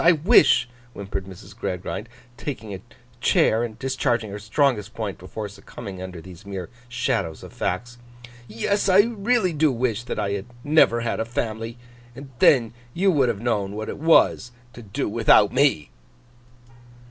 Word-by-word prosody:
I 170 Hz, -, +7 dB
wish,' 155 Hz, -, +5 dB, 0.3 s
whimpered 100 Hz, -2 st, -5 dB
Mrs. 95 Hz, -2 st, -12 dB
Gradgrind, 95 Hz, +4 st, -4 dB, 0.3 s
taking 120 Hz, -7 st, -6 dB
a 95 Hz, -, -7 dB, 0.4 s
chair, 110 Hz, +2 st, +3 dB
and 110 Hz, -2 st, -5 dB
discharging 120 Hz, -4 st, -1 dB
her 100 Hz, -, -6 dB
strongest 110 Hz, -1 st, 0 dB
point 105 Hz, -4 st, -4 dB
before 95 Hz, +4 st, -6 dB
succumbing 100 Hz, -1 st, -9 dB
under 95 Hz, -2 st, -7 dB
these 90 Hz, +2 st, -13 dB
mere 95 Hz, -3 st, -7 dB, 0.2 s
shadows 120 Hz, -, -2 dB
of -, -, -11 dB
facts, 120 Hz, +7 st, -3 dB, 0.5 s
'yes, 195 Hz, -, 0 dB
I 190 Hz, +2 st, +7 dB
really 225 Hz, -3 st, 0 dB
do 155 Hz, -1 st, +3 dB
wish 115 Hz, -3 st, -1 dB
that -, -, -4 dB
I 100 Hz, -, -1 dB
had 100 Hz, +2 st, -4 dB, 0.2 s
never 145 Hz, -6 st, +4 dB
had 115 Hz, -, -2 dB
a -, -, +1 dB
family, 115 Hz, 0 st, -4 dB, 0.4 s
and 135 Hz, +1 st, -10 dB
then 115 Hz, -5 st, +4 dB, 0.2 s
you 190 Hz, +2 st, +3 dB
would 135 Hz, -7 st, +2 dB
have 105 Hz, -3 st, -3 dB
known 105 Hz, -5 st, -1 dB
what 110 Hz, +1 st, -5 dB
it -, -, -6 dB
was 160 Hz, -5 st, +4 dB, 0.2 s
to 120 Hz, -, -10 dB
do 100 Hz, -3 st, -3 dB
without 105 Hz, -1 st, +4 dB
me! 130 Hz, -, +2 dB
115 Hz, 160 wpm, -23 LUFS, 100-135 Hz, 0.5 s, I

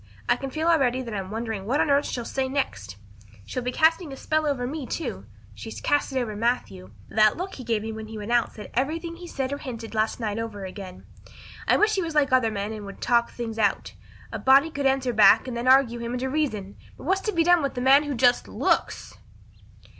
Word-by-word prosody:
I -, -, +4 dB
can 270 Hz, -, -5 dB
feel 315 Hz, +5 st, -2 dB
already 260 Hz, -6 st, +2 dB
that 230 Hz, -3 st, -7 dB
I'm 190 Hz, -2 st, -4 dB
wondering 220 Hz, -2 st, -4 dB
what 275 Hz, +6 st, +1 dB
on 295 Hz, -, +2 dB
earth 280 Hz, +1 st, +3 dB
she'll 240 Hz, -2 st, -4 dB
say 265 Hz, +1 st, -2 dB
next. 105 Hz, -, -3 dB, 0.5 s
She'll 250 Hz, -, -4 dB
be 250 Hz, +1 st, -2 dB
casting 320 Hz, +3 st, +2 dB
a 270 Hz, -, -8 dB
spell 310 Hz, +2 st, 0 dB
over 265 Hz, -4 st, -1 dB
me, 275 Hz, 0 st, -5 dB
too. 235 Hz, -, -5 dB, 0.3 s
She's 105 Hz, +1 st, -8 dB
cast 290 Hz, -, +1 dB
it 265 Hz, -, 0 dB
over 225 Hz, -4 st, -3 dB
Matthew. 205 Hz, -, -2 dB, 0.2 s
That 215 Hz, -1 st, +3 dB
look 370 Hz, +3 st, -5 dB
he 255 Hz, -, -8 dB
gave 225 Hz, -3 st, -1 dB
me 225 Hz, -, -4 dB
when 220 Hz, 0 st, -7 dB
he 220 Hz, 0 st, -8 dB
went 210 Hz, +2 st, -5 dB
out 240 Hz, -1 st, +2 dB
said 210 Hz, -, -10 dB
everything 325 Hz, +7 st, -2 dB
he 350 Hz, 0 st, -9 dB
said 270 Hz, -4 st, -3 dB
or 285 Hz, -, -4 dB
hinted 230 Hz, -4 st, -7 dB
last 220 Hz, +2 st, 0 dB
night 215 Hz, -2 st, -2 dB
over 210 Hz, -4 st, -5 dB
again. 185 Hz, -1 st, -9 dB, 0.6 s
I -, -, +4 dB
wish 430 Hz, 0 st, +3 dB
he 390 Hz, -, +1 dB
was 325 Hz, -3 st, -4 dB
like 280 Hz, -3 st, +3 dB
other 255 Hz, -3 st, +4 dB
men 205 Hz, 0 st, -4 dB
and 215 Hz, -1 st, -7 dB
would 200 Hz, -, -10 dB
talk 235 Hz, -1 st, +2 dB
things 225 Hz, -2 st, -6 dB
out. 205 Hz, -2 st, 0 dB, 0.4 s
A -, -, -4 dB
body 275 Hz, +5 st, +5 dB
could 280 Hz, -2 st, 0 dB
answer 265 Hz, -2 st, +1 dB
back 215 Hz, 0 st, +6 dB
then 255 Hz, -2 st, -5 dB
and 240 Hz, +2 st, 0 dB
argue 260 Hz, -3 st, +4 dB
him 235 Hz, +1 st, -4 dB
into 255 Hz, +1 st, -2 dB
reason. 220 Hz, -10 st, -2 dB, 0.2 s
But -, -, -12 dB
what's 380 Hz, +5 st, +1 dB
to 425 Hz, -, -1 dB
be 335 Hz, -4 st, +2 dB
done 350 Hz, 0 st, +5 dB
with 275 Hz, -3 st, -3 dB
a -, -, -1 dB
man 270 Hz, +3 st, +6 dB
who 290 Hz, -2 st, -3 dB
just 245 Hz, 0 st, +3 dB
_looks? -, -, -1 dB
245 Hz, 235 wpm, -25 LUFS, 220-285 Hz, 0.6 s, back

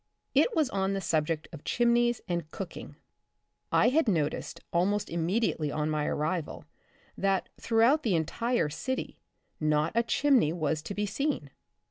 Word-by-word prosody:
It 475 Hz, -, +3 dB
was 310 Hz, -3 st, +3 dB
on 195 Hz, 0 st, 0 dB
the 195 Hz, -, -1 dB
subject 160 Hz, -3 st, -1 dB
of 155 Hz, -, -9 dB
chimneys 240 Hz, 0 st, +2 dB
and 170 Hz, -4 st, -2 dB
cooking. 190 Hz, +1 st, -7 dB, 0.8 s
I -, -, +5 dB
had 295 Hz, +1 st, +2 dB
noticed 160 Hz, -8 st, -1 dB
almost 195 Hz, +4 st, +1 dB
immediately 170 Hz, -2 st, 0 dB
on 150 Hz, +1 st, -1 dB
my 150 Hz, -1 st, 0 dB
arrival 155 Hz, +2 st, -2 dB, 0.5 s
that, 195 Hz, -1 st, 0 dB
throughout 235 Hz, +7 st, +3 dB
the 215 Hz, -, +1 dB
entire 200 Hz, +3 st, 0 dB
city, 260 Hz, -, -4 dB, 0.4 s
not 155 Hz, 0 st, +1 dB
a 230 Hz, -, +3 dB
chimney 240 Hz, -, +3 dB
was 155 Hz, -2 st, -1 dB
to 195 Hz, +5 st, -6 dB
be 210 Hz, -, 0 dB
seen. 260 Hz, -, -2 dB
190 Hz, 145 wpm, -29 LUFS, 155-235 Hz, 0.8 s, I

